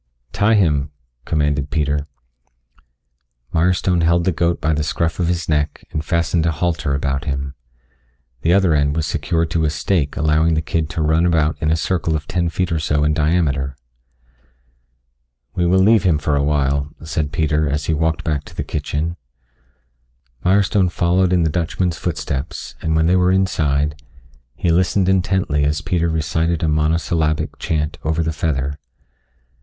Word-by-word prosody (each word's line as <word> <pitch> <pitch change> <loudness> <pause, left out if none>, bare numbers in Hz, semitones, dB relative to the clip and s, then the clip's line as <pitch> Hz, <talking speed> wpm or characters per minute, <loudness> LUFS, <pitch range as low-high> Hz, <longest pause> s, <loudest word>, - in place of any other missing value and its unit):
"Tie 105 +7 +3
him," 75 -8 +2 0.4
commanded 75 -2 0
Peter. 75 -1 -1 1.5
Mirestone 90 +1 +2
held 85 +1 +3
the 95 - +2
goat 85 0 0
by 80 +1 +1
the 75 - 0
scruff 85 +3 -1
of 85 - +1
his 85 -2 -1
neck 75 -1 -1
and 75 - -3
fastened 85 +1 0
a - - +2
halter 80 -3 -1
about 70 0 -2
him. 70 -1 -3 0.9
The 85 - +2
other 95 -3 +4
end 70 -1 +1
was 80 -1 0
secured 80 +2 -1
to 80 -1 +1
a 75 - +2
stake 75 0 -1
allowing 80 +2 +2
the 80 - +1
kid 80 0 -1
to 85 -2 -2
run 80 +2 +2
about 80 -2 +2
in 80 - +1
a 80 - +3
circle 80 -1 -1
of 75 -1 -3
ten 85 -2 0
feet 90 +2 -2
or 80 - 0
so 75 -1 0
in 75 0 +2
diameter. 75 -4 0 1.8
"We 85 -1 0
will 90 +2 +3
leave 105 +3 +5
him 85 -4 +2
for 75 0 0
awhile," 70 0 +1
said 75 -2 -2
Peter 75 -1 +1
as 75 +1 -2
he 80 - 0
walked 80 +2 0
back 75 -3 -1
to - - -13
the - - -3
kitchen. 80 +3 -3 1.3
Mirestone 95 0 +3
followed 90 +1 +1
in 90 -2 +3
the 80 - +1
Dutchman's 85 +1 -1
footsteps, 75 -5 -4
and 80 0 0
when 80 0 +3
they 90 +2 +3
were 90 0 +3
inside, 75 -6 0 0.5
he 85 - 0
listened 90 +2 +2
intently 95 -5 +1
as 75 +1 0
Peter 85 +2 0
recited 80 +1 -1
a - - +2
monosyllabic 80 0 0
chant 75 -1 -2
over 80 +1 0
the 80 0 -2
feather. 70 -2 -2
80 Hz, 165 wpm, -19 LUFS, 75-85 Hz, 1.8 s, leave